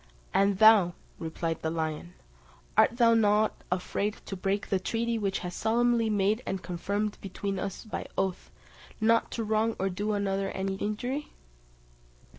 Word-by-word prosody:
"And 200 Hz, 0 st, +3 dB
thou," 210 Hz, -4 st, +7 dB, 0.3 s
replied 165 Hz, 0 st, -3 dB
the 160 Hz, -, -1 dB
lion, 160 Hz, +1 st, -3 dB, 0.6 s
"art 235 Hz, -, +4 dB
thou 230 Hz, -2 st, +5 dB
not 215 Hz, -1 st, +2 dB
afraid 200 Hz, +3 st, -1 dB
to 195 Hz, -, -5 dB
break 195 Hz, +2 st, -1 dB
the 195 Hz, -, +1 dB
treaty 230 Hz, +4 st, -1 dB
which 195 Hz, -2 st, -1 dB
was 180 Hz, 0 st, -4 dB
solemnly 230 Hz, +1 st, +2 dB
made 210 Hz, +2 st, +2 dB
and 190 Hz, -1 st, -4 dB
confirmed 200 Hz, +4 st, -2 dB
between 195 Hz, 0 st, -4 dB
us 195 Hz, +3 st, -5 dB
by 215 Hz, -, -5 dB
oath, 190 Hz, -2 st, -1 dB, 0.5 s
not 230 Hz, +1 st, +3 dB
to 230 Hz, -, -2 dB
wrong 220 Hz, +1 st, +1 dB
or 195 Hz, 0 st, -1 dB
do 205 Hz, +4 st, -3 dB
one 205 Hz, -1 st, 0 dB
another 195 Hz, 0 st, -1 dB
any 190 Hz, 0 st, -2 dB
injury?" 245 Hz, +9 st, -3 dB
205 Hz, 155 wpm, -29 LUFS, 190-220 Hz, 0.6 s, thou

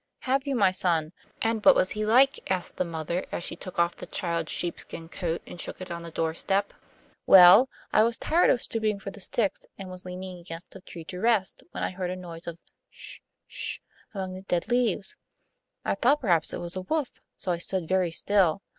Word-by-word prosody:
'Have 270 Hz, +2 st, 0 dB
you, 275 Hz, -, 0 dB
my 200 Hz, -6 st, +4 dB
son; 170 Hz, -4 st, +1 dB, 0.3 s
and 225 Hz, -1 st, 0 dB
what 285 Hz, -, +8 dB
was 185 Hz, -, +2 dB
he 215 Hz, -, -2 dB
like?' 255 Hz, +6 st, +5 dB
asked 185 Hz, -2 st, -2 dB
the -, -, +2 dB
mother, 170 Hz, +1 st, -3 dB
as -, -, -3 dB
she -, -, -3 dB
took 185 Hz, +1 st, -9 dB
off 170 Hz, 0 st, +2 dB
the -, -, -9 dB
child's 170 Hz, -3 st, -2 dB
sheepskin 170 Hz, -1 st, -5 dB
coat 170 Hz, 0 st, -3 dB
and 175 Hz, -, -8 dB
shook -, -, -6 dB
it 185 Hz, -1 st, -7 dB
on 170 Hz, 0 st, -4 dB
the 170 Hz, -, -7 dB
doorstep. 165 Hz, +5 st, -1 dB, 0.5 s
'Well, 190 Hz, +7 st, +9 dB, 0.2 s
I 215 Hz, -, +6 dB
was 230 Hz, +1 st, +2 dB
tired 335 Hz, +3 st, +3 dB
of 245 Hz, -, +2 dB
stooping 215 Hz, -3 st, -1 dB
for 195 Hz, -, -6 dB
the 205 Hz, -, -12 dB
sticks, 200 Hz, +1 st, 0 dB, 0.2 s
and 190 Hz, -2 st, -8 dB
was 185 Hz, 0 st, -6 dB
leaning 185 Hz, 0 st, -7 dB
against 170 Hz, 0 st, -9 dB
a -, -, -10 dB
tree 170 Hz, -2 st, -9 dB
to 180 Hz, +3 st, -7 dB
rest, 220 Hz, -3 st, +1 dB
when -, -, -5 dB
I -, -, -1 dB
heard 185 Hz, -1 st, -3 dB
a 180 Hz, -, -3 dB
noise 170 Hz, -2 st, -9 dB
of 170 Hz, -1 st, -5 dB, 0.3 s
'sh -, -, -8 dB, 0.3 s
'sh, -, -, -2 dB, 0.3 s
among 190 Hz, -3 st, -4 dB
the 185 Hz, -, -7 dB
dead 180 Hz, -3 st, -1 dB
leaves. 240 Hz, -6 st, +1 dB, 0.7 s
I -, -, +2 dB
thought 280 Hz, +4 st, +3 dB
perhaps 170 Hz, -9 st, +2 dB
it -, -, -3 dB
was 175 Hz, +1 st, -3 dB
a 185 Hz, -, -2 dB
wolf, 295 Hz, +7 st, -2 dB, 0.2 s
so 185 Hz, -, -1 dB
I 170 Hz, -, -1 dB
stood 180 Hz, -1 st, -2 dB
very 185 Hz, -1 st, +2 dB
still. 195 Hz, +1 st, +2 dB
185 Hz, 215 wpm, -27 LUFS, 170-215 Hz, 0.7 s, Well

